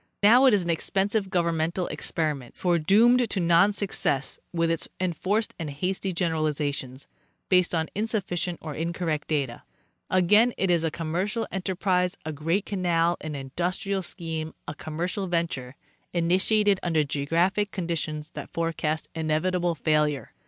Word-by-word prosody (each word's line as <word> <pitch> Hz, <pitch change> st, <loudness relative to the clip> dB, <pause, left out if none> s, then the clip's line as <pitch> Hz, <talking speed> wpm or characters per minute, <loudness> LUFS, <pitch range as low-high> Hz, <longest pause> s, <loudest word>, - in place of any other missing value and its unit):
Now 245 Hz, +6 st, +7 dB
it 255 Hz, -, +6 dB
is 195 Hz, -, +1 dB
an 170 Hz, -, -4 dB
expensive 195 Hz, +4 st, 0 dB
governmental 170 Hz, 0 st, 0 dB
experiment, 150 Hz, -6 st, -2 dB
foredoomed 205 Hz, +8 st, +4 dB
to 200 Hz, -, -1 dB
non 170 Hz, +3 st, +5 dB
success 195 Hz, -9 st, -1 dB
with 165 Hz, -1 st, +1 dB
its 165 Hz, -, -1 dB
enforced 185 Hz, +4 st, 0 dB
and 160 Hz, -3 st, -3 dB
hasty 185 Hz, +6 st, -2 dB
generalizations, 150 Hz, -6 st, -2 dB, 0.4 s
based 180 Hz, -2 st, +3 dB
on 160 Hz, -1 st, 0 dB
insufficient 185 Hz, -5 st, -1 dB
or 155 Hz, -2 st, -5 dB
incorrect 165 Hz, -1 st, -2 dB
data; 140 Hz, -6 st, -1 dB, 0.5 s
again 210 Hz, +6 st, +4 dB
it 190 Hz, -2 st, +1 dB
is 170 Hz, -2 st, +2 dB
a 165 Hz, -, +1 dB
commercial 180 Hz, +9 st, -2 dB
enter 190 Hz, 0 st, -2 dB
prise, 180 Hz, 0 st, +1 dB
a 155 Hz, -, -2 dB
great 165 Hz, +7 st, 0 dB
canal, 175 Hz, -3 st, +1 dB
an 155 Hz, -1 st, -5 dB
industrial 180 Hz, +8 st, -2 dB
scheme, 160 Hz, -3 st, -5 dB
a 150 Hz, -, -3 dB
commercial 170 Hz, +6 st, -3 dB
venture, 165 Hz, -7 st, -2 dB, 0.4 s
initiated 190 Hz, +4 st, +3 dB
under 160 Hz, -3 st, +2 dB
geographic 165 Hz, +8 st, 0 dB
conditions 160 Hz, -5 st, -3 dB
that -, -, -7 dB
forecast 160 Hz, -1 st, -2 dB
inevitable 170 Hz, +2 st, 0 dB
failure. 150 Hz, -4 st, 0 dB
170 Hz, 140 wpm, -26 LUFS, 155-190 Hz, 0.5 s, Now